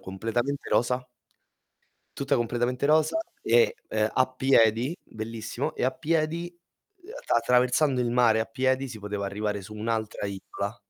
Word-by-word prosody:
completamente 115 +8 -3
rosa. 125 +1 +1 1.1
Tutta 140 0 +1
completamente 120 +2 -1
rosa 155 - +3 0.2
e, 470 0 +4
ehm, 110 0 +1
a 130 - +3
piedi, 130 0 +3
bellissimo, 110 0 -5
e - - 0
a 130 - +2
piedi, 165 +1 -1
ehm, 360 - -19
attr - - -2
attraversando 125 +3 +2
il 120 -1 0
mare 120 -2 +4
a 110 - +1
piedi 130 0 0
si 115 -3 -8
poteva 105 -1 -4
arrivare 105 0 -3
su 100 - -10
un'altra 110 -1 -3
isola 100 +2 -5
125 Hz, 145 wpm, -27 LUFS, 110-140 Hz, 1.1 s, e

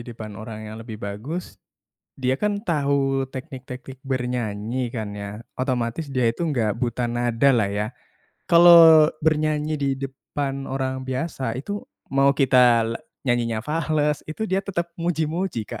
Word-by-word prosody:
depan 115 -3 -8
orang 110 -1 -7
yang 110 +1 -8
lebih 115 -1 -7
bagus, 105 - -6 0.6
dia 130 0 +1
kan 205 +7 -1
tahu 140 -8 +1
teknik-teknik 130 0 -8
bernyanyi 125 -2 -2
kan 110 -4 -5
ya, 100 0 -6 0.3
otomatis 130 +2 -2
dia 130 -3 +1
itu 115 +8 0
nggak 120 -11 0
buta 120 +1 -1
nada 120 +2 +1
lah 110 -4 +2
ya. 105 +1 -1 0.6
Kalo 170 +1 +7 0.6
bernyanyi 155 -1 +1
di 140 - +1
depan 135 0 -5
orang 130 -1 -3
biasa, 130 -3 -2
itu 205 +10 -4 0.3
mau 140 0 +4
kita 125 -4 +5
la 115 +1 -3 0.3
nyanyinya 120 -3 0
fales, 150 -1 0
itu 190 +8 -3
dia 190 -2 0
tetep 195 -3 -2 0.2
muji-muji, 165 - -1
Kak. - - -7
130 Hz, 140 wpm, -23 LUFS, 115-150 Hz, 0.6 s, Kalo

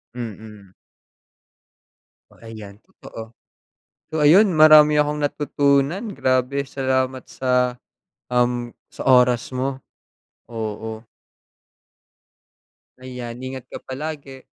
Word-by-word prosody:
Mm. 105 -4 -9 1.6
Oh, - - -21
ayan 105 -3 -10
totoo. 115 0 -12 0.8
So 155 - -1
ayun, 180 +7 +6
marami 155 -1 +7
akong 150 0 -1
natutunan. 145 - 0
Grabe! 130 +1 0
salamat 130 -1 -1
sa, 125 -1 0 0.5
um, 120 -1 -1 0.2
sa - - -8
oras 125 -1 +3
mo. 130 +1 -2 0.7
Oo. 110 -1 -6 2.0
Ayan, 125 -2 -8
ingat 130 -1 -7
ka - - -7
palagi! 140 -1 -7
130 Hz, 85 wpm, -21 LUFS, 120-140 Hz, 2.0 s, marami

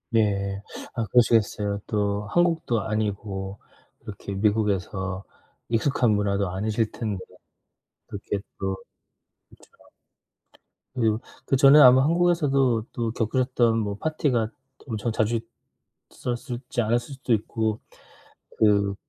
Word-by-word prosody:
예. 100 -2 +1 0.3
아 115 - 0
그러시겠어요. 105 -4 +2
또 105 -1 -1
한국도 165 -9 +1
아니고 100 -2 -3 0.4
이렇게 100 -1 -7
미국에서 95 -2 -1 0.4
익숙한 120 0 +2
문화도 100 -2 +1
아니실 105 +4 -1
텐데. 105 -5 -4 0.8
그렇게 100 0 -4 0.2
또 95 0 -1 0.7
그쵸. - - -21 1.2
그리고 110 -3 +1 0.3
그전에 135 +2 +6
아마 130 -1 +8
한국에서도 145 -8 +2
또 115 -2 -2
겪으셨던 120 0 +1
뭐 100 -2 -2
파티가 135 -8 0 0.4
엄청 110 0 -2
자주 110 +1 +1 0.7
있었을지 120 0 -4
않았을 120 +5 -1
수도 130 -3 -1
있고 110 0 -1 0.8
그 100 -2 +3
110 Hz, 240 characters per minute, -25 LUFS, 100-125 Hz, 1.2 s, 아마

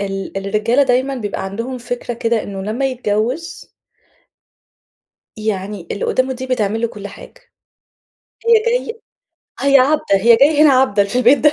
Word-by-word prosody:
ال 195 -1 -5
الرجالة 215 +7 +1
دايمًا 260 +1 +1
بيبقى 205 -5 -4
عندهم 230 +7 -5
فكرة 245 0 -5
كده 230 -1 -1
إنه 195 -1 -6
لمّا 230 +7 -2
يتجوّز 250 - -3 1.7
يعني 200 -4 -4
اللي 200 - -3
قدامه 260 +1 0
دي 260 +1 -7
بتعمل 220 -3 -1
له 235 - +1
كل 205 -2 -9
حاجة، - - -14 1.1
هي 465 - +4
جاي 465 -1 -1 0.6
هي 275 0 +5
عبدة 300 +4 +2
هي 230 +4 +5
جاية 295 +3 +4
هنا 300 - +6
عبدة 255 -6 +3
في 200 +4 -4
البيت 250 +3 +5
ده. 300 -1 +4
235 Hz, 150 wpm, -17 LUFS, 205-265 Hz, 1.7 s, هنا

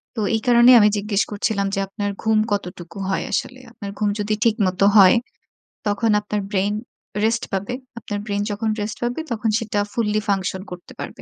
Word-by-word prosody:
তো 225 - -2
এই 220 - -1
কারণেই 240 +1 +7
আমি 210 -1 +6
জিজ্ঞেস 205 -1 0
করছিলাম 200 -1 0
যে, 195 - 0
আপনার 205 +1 -3
ঘুম 220 -1 +3
কতটুকু 180 -2 -4
হয় 190 - -1
আসলে? 255 - -2
আপনার 200 -4 -7
ঘুম 210 -1 +2
যদি 210 +1 0
ঠিকমত 205 -5 +1 0.2
হয়, 190 0 +8 0.7
তখন 205 +2 +1
আপনার 210 0 -3
brain 200 0 +1 0.5
rest 225 +1 +1
পাবে। 195 +5 -2 0.3
আপনার 205 -2 -4
brain 205 -1 -1
যখন 210 +2 -2
rest 205 +1 -4
পাবে 240 +4 -1
তখন 225 -1 0
সেটা 215 -3 -2
fully 215 -2 0
function 190 -1 0
করতে 180 0 -9
পারবে। - - -7
210 Hz, 175 wpm, -21 LUFS, 200-220 Hz, 0.7 s, হয়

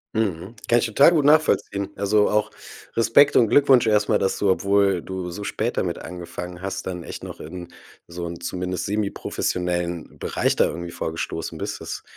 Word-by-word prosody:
Mhm, 100 -1 -2
kann 120 0 +5
ich 120 - 0
total 135 +9 +5
gut 155 -4 +2
nachvollziehen. 145 -10 +2
Also, 105 +1 +2
auch 105 0 +1 0.5
Respekt 115 +5 +5
und 115 -3 +5
Glückwunsch 135 -4 +5
erst 105 -1 +2
mal, - - +3
dass 95 - 0
du 100 - +2
obwohl 100 -1 +2
du 95 -1 -5
so 100 +4 -7
spät 115 +4 -2
damit 85 -2 -1
angefangen 90 +1 -8
hast, 95 -1 -4
dann 90 -2 -5
echt - - -8
noch - - -9
in 85 +2 -8 0.4
so 85 0 -6
'n 85 0 -6
zumindest 90 0 -3
semiprofessionellen 90 -4 -2
Bereich - - 0
da - - +4
irgendwie 85 0 -6
vorgestoßen 80 0 -4
bist. - - -5
Das - - -6
95 Hz, 180 wpm, -23 LUFS, 90-110 Hz, 0.5 s, kann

